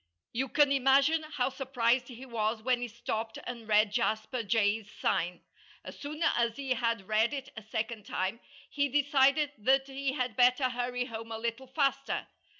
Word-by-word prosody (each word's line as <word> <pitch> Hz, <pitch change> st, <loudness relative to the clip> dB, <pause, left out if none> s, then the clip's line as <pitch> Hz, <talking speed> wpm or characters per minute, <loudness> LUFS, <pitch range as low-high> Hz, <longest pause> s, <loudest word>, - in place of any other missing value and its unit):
You 265 Hz, +3 st, -1 dB
can 290 Hz, -2 st, +4 dB
imagine 275 Hz, +4 st, +4 dB
how 295 Hz, -5 st, -1 dB
surprised 250 Hz, -2 st, 0 dB
he 255 Hz, +1 st, -10 dB
was 220 Hz, -2 st, -2 dB
when 250 Hz, 0 st, +1 dB
he 245 Hz, -, -2 dB
stopped 225 Hz, -1 st, -4 dB
and 235 Hz, -3 st, -7 dB
read 210 Hz, -1 st, +4 dB
Jasper 220 Hz, +2 st, -1 dB
Jay's 210 Hz, 0 st, +1 dB
sign. 175 Hz, 0 st, -1 dB, 0.4 s
As -, -, -10 dB
soon 300 Hz, +3 st, -4 dB
as 235 Hz, -8 st, +2 dB
he 275 Hz, -2 st, -4 dB
had 230 Hz, -5 st, 0 dB
read 220 Hz, +5 st, +2 dB
it 270 Hz, -1 st, -6 dB
a 220 Hz, -, -7 dB
second 220 Hz, 0 st, -4 dB
time 190 Hz, +5 st, -2 dB, 0.3 s
he 285 Hz, -1 st, 0 dB
decided 285 Hz, +1 st, +3 dB
that 265 Hz, +5 st, +3 dB
he 270 Hz, 0 st, -3 dB
had 250 Hz, -5 st, -2 dB
better 250 Hz, +2 st, +4 dB
hurry 245 Hz, 0 st, -2 dB
home 225 Hz, -2 st, -7 dB
a 225 Hz, -, -3 dB
little 235 Hz, +3 st, -4 dB
faster. 275 Hz, 0 st, 0 dB
245 Hz, 170 wpm, -30 LUFS, 225-270 Hz, 0.4 s, can